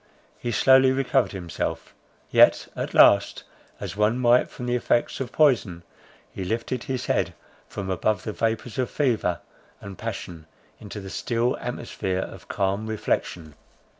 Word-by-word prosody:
He 120 Hz, -, -3 dB
slowly 130 Hz, +3 st, +5 dB
recovered 130 Hz, -4 st, +1 dB
himself; 90 Hz, -5 st, -5 dB, 0.4 s
yet, -, -, +5 dB
at -, -, -4 dB
last, -, -, +5 dB, 0.4 s
as -, -, -6 dB
one 105 Hz, +3 st, +2 dB
might 120 Hz, 0 st, +4 dB
from 125 Hz, -, -8 dB
the 120 Hz, -, -1 dB
effects 120 Hz, -1 st, 0 dB
of 130 Hz, -3 st, -4 dB
poison, 115 Hz, -, +2 dB, 0.5 s
he 95 Hz, -, -5 dB
lifted 115 Hz, +5 st, -3 dB
his 130 Hz, -2 st, -3 dB
head -, -, 0 dB, 0.3 s
from 100 Hz, -, -6 dB
above 95 Hz, +2 st, 0 dB
the 110 Hz, -, -4 dB
vapours 115 Hz, +2 st, -2 dB
of 125 Hz, -, 0 dB
fever 115 Hz, -, 0 dB, 0.4 s
and 100 Hz, -1 st, -10 dB
passion 90 Hz, -8 st, -6 dB, 0.3 s
into 105 Hz, 0 st, -8 dB
the 95 Hz, 0 st, -8 dB
still 120 Hz, +1 st, 0 dB
atmosphere 115 Hz, -6 st, -4 dB
of -, -, -11 dB
calm 100 Hz, +2 st, -1 dB
reflection. 90 Hz, -7 st, -2 dB
115 Hz, 145 wpm, -25 LUFS, 95-125 Hz, 0.5 s, slowly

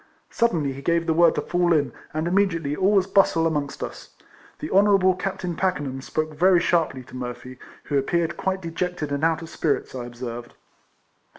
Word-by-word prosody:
Suddenly 165 Hz, -, +1 dB
he 135 Hz, -, -9 dB
gave 170 Hz, +3 st, +1 dB
the 160 Hz, -, +1 dB
word 170 Hz, 0 st, +4 dB
to -, -, 0 dB
fall 175 Hz, 0 st, +1 dB
in, 145 Hz, -3 st, +1 dB, 0.2 s
and 155 Hz, +2 st, -2 dB
immediately 170 Hz, -6 st, +1 dB
all 190 Hz, +6 st, +2 dB
was 195 Hz, -2 st, +4 dB
bustle 195 Hz, -4 st, +3 dB
amongst 150 Hz, -3 st, -2 dB
us. -, -, -8 dB, 0.4 s
The -, -, -6 dB
Honourable 195 Hz, -1 st, +5 dB
Captain 185 Hz, -2 st, -4 dB
Packenham 145 Hz, -8 st, -2 dB
spoke 155 Hz, +3 st, -3 dB
very 180 Hz, +3 st, +4 dB
sharply 165 Hz, -7 st, 0 dB
to 125 Hz, -, -14 dB
Murphy, 125 Hz, 0 st, -7 dB, 0.2 s
who 140 Hz, -2 st, 0 dB
appeared 170 Hz, +4 st, 0 dB
quite 190 Hz, -1 st, -2 dB
dejected 165 Hz, -2 st, -3 dB
and 140 Hz, +1 st, -2 dB
out 165 Hz, 0 st, +1 dB
of 165 Hz, -, -9 dB
spirits, 155 Hz, -3 st, -1 dB
I 125 Hz, -2 st, -5 dB
observed. 120 Hz, 0 st, -7 dB
165 Hz, 180 wpm, -24 LUFS, 140-180 Hz, 0.4 s, Honourable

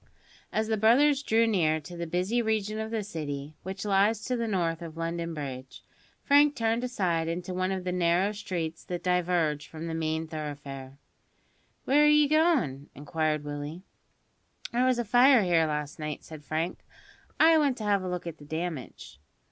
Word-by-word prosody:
As 220 Hz, 0 st, 0 dB
the 220 Hz, -1 st, 0 dB
brothers 270 Hz, +7 st, +4 dB
drew 230 Hz, -4 st, +3 dB
near 165 Hz, -8 st, +2 dB
to 160 Hz, +4 st, -10 dB
the 170 Hz, 0 st, -4 dB
busy 185 Hz, +8 st, 0 dB
region 215 Hz, -1 st, -1 dB
of 220 Hz, 0 st, -3 dB
the 220 Hz, -2 st, -2 dB
City 150 Hz, -6 st, -5 dB
which 190 Hz, +2 st, -6 dB
lies 205 Hz, +2 st, +2 dB
to 255 Hz, -, -1 dB
the 235 Hz, -1 st, -2 dB
north 170 Hz, -5 st, -1 dB
of 165 Hz, -1 st, -8 dB
London 165 Hz, 0 st, -3 dB
Bridge; 130 Hz, -3 st, -7 dB, 0.4 s
Frank 290 Hz, +1 st, +5 dB
turned 230 Hz, 0 st, 0 dB
aside 180 Hz, -10 st, 0 dB
into 175 Hz, +2 st, -3 dB
one 185 Hz, +1 st, -1 dB
of 190 Hz, -1 st, -3 dB
the 180 Hz, -, -2 dB
narrow 180 Hz, +2 st, +2 dB
streets 170 Hz, -6 st, -4 dB
that 175 Hz, -1 st, -5 dB
diverge 175 Hz, -4 st, +1 dB
from 160 Hz, 0 st, -8 dB
the 165 Hz, -, -4 dB
main 160 Hz, 0 st, -1 dB
thoroughfare. 140 Hz, -3 st, -7 dB, 0.9 s
"Where 295 Hz, +3 st, +5 dB
are -, -, +6 dB
ye 300 Hz, 0 st, +5 dB
goin'?" 280 Hz, -, +2 dB
inquired 155 Hz, +1 st, -1 dB
Willie. 145 Hz, +4 st, -6 dB, 0.9 s
"There 250 Hz, +2 st, +2 dB
was 255 Hz, -1 st, +2 dB
a 240 Hz, -, -1 dB
fire 245 Hz, +1 st, +6 dB
here 170 Hz, -3 st, +3 dB
last 150 Hz, -1 st, -4 dB
night," 150 Hz, -1 st, -5 dB
said 155 Hz, -2 st, -11 dB
Frank; 160 Hz, +4 st, -2 dB, 0.6 s
"I 320 Hz, 0 st, +6 dB
want 280 Hz, -4 st, +1 dB
to 220 Hz, -, -6 dB
have 205 Hz, -2 st, +2 dB
a 185 Hz, -, -4 dB
look 180 Hz, -1 st, -4 dB
at 165 Hz, -2 st, -7 dB
the 145 Hz, -, -12 dB
damage." 160 Hz, -, -6 dB
180 Hz, 180 wpm, -28 LUFS, 155-220 Hz, 0.9 s, are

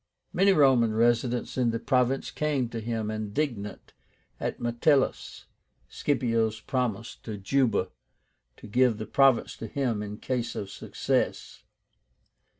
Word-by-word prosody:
Many 195 Hz, +2 st, +4 dB
Roman 130 Hz, -, +4 dB
residents 120 Hz, +2 st, +1 dB
in 120 Hz, -2 st, +3 dB
the 115 Hz, -, -1 dB
province 130 Hz, +2 st, +1 dB
came 145 Hz, -6 st, -1 dB
to 115 Hz, -, -5 dB
him, 110 Hz, -1 st, -3 dB
indignant 110 Hz, 0 st, -4 dB, 0.5 s
at -, -, -3 dB
Metellus 130 Hz, +4 st, +1 dB, 0.4 s
Scipio's 115 Hz, -6 st, 0 dB
promise 120 Hz, -5 st, -2 dB
to 110 Hz, -2 st, -7 dB
Juba 110 Hz, -1 st, +1 dB, 0.7 s
to -, -, -13 dB
give 120 Hz, +1 st, +3 dB
the 110 Hz, -, -5 dB
province 135 Hz, +2 st, +3 dB
to 115 Hz, -, -6 dB
him 120 Hz, -3 st, -1 dB
in 105 Hz, 0 st, -6 dB
case 125 Hz, -1 st, -3 dB
of 100 Hz, -1 st, -5 dB
success. -, -, -2 dB
120 Hz, 125 wpm, -27 LUFS, 110-130 Hz, 0.7 s, Many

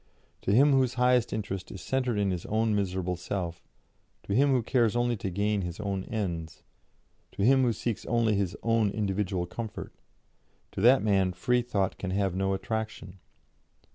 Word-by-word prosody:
To -, -, -1 dB
him 140 Hz, +7 st, +5 dB
whose 130 Hz, -2 st, +2 dB
highest 125 Hz, -1 st, +3 dB
interest 100 Hz, -4 st, -4 dB
is 95 Hz, -, -8 dB
centred 125 Hz, +3 st, -1 dB
in 100 Hz, -2 st, +1 dB
his 90 Hz, -2 st, -4 dB
own 110 Hz, 0 st, +1 dB
miserable 95 Hz, -2 st, -1 dB
self, 85 Hz, -1 st, -4 dB, 0.6 s
to 100 Hz, -, -3 dB
him 140 Hz, +6 st, +4 dB
who 130 Hz, -3 st, +2 dB
cares 120 Hz, -2 st, +2 dB
only 120 Hz, 0 st, +1 dB
to 100 Hz, -, -3 dB
gain 100 Hz, +2 st, 0 dB
his 90 Hz, 0 st, -5 dB
own 100 Hz, -2 st, -3 dB
ends, 85 Hz, -7 st, -4 dB, 0.7 s
to 100 Hz, -, -2 dB
him 135 Hz, +4 st, +5 dB
who 125 Hz, -2 st, +3 dB
seeks 115 Hz, 0 st, -3 dB
only 115 Hz, -2 st, +2 dB
his 100 Hz, -3 st, -1 dB
own 115 Hz, -2 st, +2 dB
individual 95 Hz, -3 st, -1 dB
comfort, 110 Hz, +4 st, -7 dB, 0.8 s
to -, -, -5 dB
that 125 Hz, +1 st, +6 dB
man 95 Hz, -3 st, +2 dB
Freethought 115 Hz, 0 st, 0 dB
can 95 Hz, -, -3 dB
have 95 Hz, -1 st, 0 dB
no 95 Hz, +1 st, 0 dB
attraction. 100 Hz, -1 st, -5 dB
105 Hz, 170 wpm, -28 LUFS, 95-120 Hz, 0.8 s, that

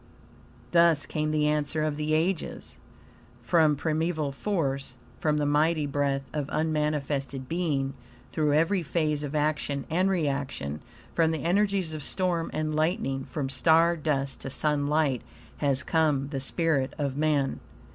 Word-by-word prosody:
Thus 170 Hz, -4 st, +4 dB
came 155 Hz, +1 st, -2 dB
the 155 Hz, -1 st, +2 dB
answer 150 Hz, +1 st, 0 dB
of 155 Hz, -1 st, 0 dB
the 150 Hz, +1 st, 0 dB
ages: 170 Hz, +2 st, -2 dB, 0.7 s
"From 155 Hz, +2 st, +4 dB
primeval 155 Hz, 0 st, -1 dB
force, 135 Hz, -6 st, -2 dB, 0.2 s
from 150 Hz, -1 st, +1 dB
the 150 Hz, -, +1 dB
mighty 150 Hz, +2 st, +2 dB
breath 140 Hz, -1 st, -1 dB
of 150 Hz, -2 st, -2 dB
unmanifested 145 Hz, -4 st, -1 dB
being, 145 Hz, -5 st, -1 dB, 0.4 s
through 150 Hz, -2 st, +1 dB
every 165 Hz, +5 st, +3 dB
phase 155 Hz, -2 st, 0 dB
of 145 Hz, 0 st, -4 dB
action 150 Hz, -2 st, 0 dB
and 185 Hz, +4 st, +2 dB
reaction, 140 Hz, -, -2 dB, 0.3 s
from 165 Hz, -1 st, +3 dB
the 160 Hz, -1 st, -2 dB
energies 195 Hz, -1 st, +1 dB
of 155 Hz, -, -5 dB
storm 175 Hz, +1 st, -1 dB
and 155 Hz, 0 st, -2 dB
lightning, 155 Hz, -, 0 dB
from 145 Hz, -4 st, -3 dB
star 165 Hz, +5 st, +4 dB
dust 140 Hz, -4 st, -1 dB
to -, -, -5 dB
sunlight, 145 Hz, -2 st, +1 dB, 0.4 s
has 140 Hz, -2 st, +1 dB
come 150 Hz, -4 st, +1 dB
the 140 Hz, -2 st, -3 dB
spirit 140 Hz, -1 st, 0 dB
of 140 Hz, -3 st, -2 dB
man!" 145 Hz, -2 st, +1 dB
150 Hz, 140 wpm, -27 LUFS, 140-160 Hz, 0.7 s, Thus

